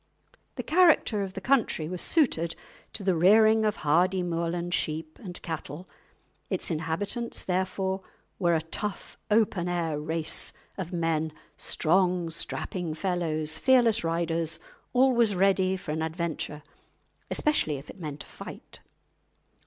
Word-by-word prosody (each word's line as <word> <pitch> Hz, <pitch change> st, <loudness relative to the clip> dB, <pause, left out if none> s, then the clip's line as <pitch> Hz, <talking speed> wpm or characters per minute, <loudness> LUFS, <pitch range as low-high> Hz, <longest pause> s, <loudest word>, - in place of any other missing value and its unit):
The -, -, -4 dB
character 320 Hz, -, +4 dB
of 195 Hz, -1 st, -4 dB
the 195 Hz, -, -5 dB
country 235 Hz, -, +2 dB
was 180 Hz, +1 st, -4 dB
suited 170 Hz, -, +2 dB, 0.4 s
to 205 Hz, -, -4 dB
the 190 Hz, -1 st, +3 dB
rearing 215 Hz, +6 st, +6 dB
of 215 Hz, -1 st, +1 dB
hardy 180 Hz, +5 st, +3 dB
Moorland 170 Hz, 0 st, -2 dB
sheep 155 Hz, -1 st, -2 dB
and 180 Hz, -5 st, -7 dB
cattle; 165 Hz, +1 st, -6 dB, 0.6 s
its -, -, -1 dB
inhabitants 170 Hz, +9 st, -2 dB
therefore 190 Hz, +1 st, -1 dB, 0.4 s
were 175 Hz, -3 st, +3 dB
a 160 Hz, -, 0 dB
tough, 195 Hz, +4 st, -5 dB
open 210 Hz, -5 st, +2 dB
air 165 Hz, -4 st, -1 dB
race 160 Hz, +1 st, -2 dB, 0.2 s
of 185 Hz, -3 st, -5 dB
men, 165 Hz, -2 st, 0 dB, 0.2 s
strong, 175 Hz, 0 st, +1 dB
strapping 165 Hz, 0 st, -3 dB
fellows, 160 Hz, -3 st, -1 dB
fearless 240 Hz, -5 st, +4 dB
riders, 165 Hz, -1 st, -1 dB, 0.3 s
always 245 Hz, -5 st, +4 dB
ready 190 Hz, 0 st, +3 dB
for 165 Hz, -, -6 dB
an 160 Hz, +1 st, -2 dB
adventure, 160 Hz, -2 st, -3 dB, 0.7 s
especially 225 Hz, -, +1 dB
if 140 Hz, +3 st, -11 dB
it -, -, -11 dB
meant 150 Hz, -3 st, -6 dB
a -, -, -18 dB
fight. -, -, -10 dB
175 Hz, 130 wpm, -28 LUFS, 160-195 Hz, 0.7 s, rearing